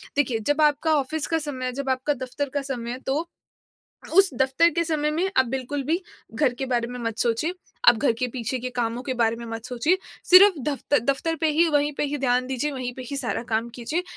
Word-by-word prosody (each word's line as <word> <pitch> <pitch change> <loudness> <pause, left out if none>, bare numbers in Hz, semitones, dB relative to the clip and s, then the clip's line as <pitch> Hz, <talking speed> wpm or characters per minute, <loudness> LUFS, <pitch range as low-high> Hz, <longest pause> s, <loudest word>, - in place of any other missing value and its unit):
देखिए, 260 -5 +1
जब 290 +7 0
आपका 300 +1 +3
ऑफिस 305 +3 -3
का 325 - +1
समय 285 -4 -4
है, 255 - -1
जब 270 +1 -4
आपका 260 +3 0
दफ़्तर 265 +1 -4
का 285 - 0
समय 245 -4 -4
है 250 - -5
तो 300 +5 0 0.9
उस 390 -1 +7
दफ़्तर 265 +7 +3
के 335 0 0
समय 300 -2 0
में 350 +5 0
आप 260 - +5
बिल्कुल 265 +2 -3
भी 330 +5 0 0.3
घर 255 0 +2
के 265 +2 -4
बारे 240 -2 0
में 250 0 -7
मत 230 -1 -3
सोचिए, 240 +8 +1 0.4
आप 235 - +8
घर 255 -3 +2
के 250 - 0
पीछे 250 +1 -3
के 255 +1 -5
कामों 240 0 -2
के 260 -1 -3
बारे 230 -1 +1
में 235 - -8
मत 225 0 -6
सोचिए। 255 +9 +1 0.3
सिर्फ़ 370 -2 +7
दफ़्तर 285 0 0
दफ़्तर 275 +7 0
पे 320 - +2
ही, 325 +3 +3
वहीं 290 0 +1
पे - - +1
ही 290 0 -2
ध्यान 255 -1 +1
दीजिए, 265 +3 -2
वहीं 255 -2 -4
पे 260 - -7
ही 280 - -3
सारा 255 -4 -2
काम 225 +1 -1
कीजिए। 300 +9 -2
265 Hz, 235 wpm, -24 LUFS, 245-300 Hz, 0.9 s, आप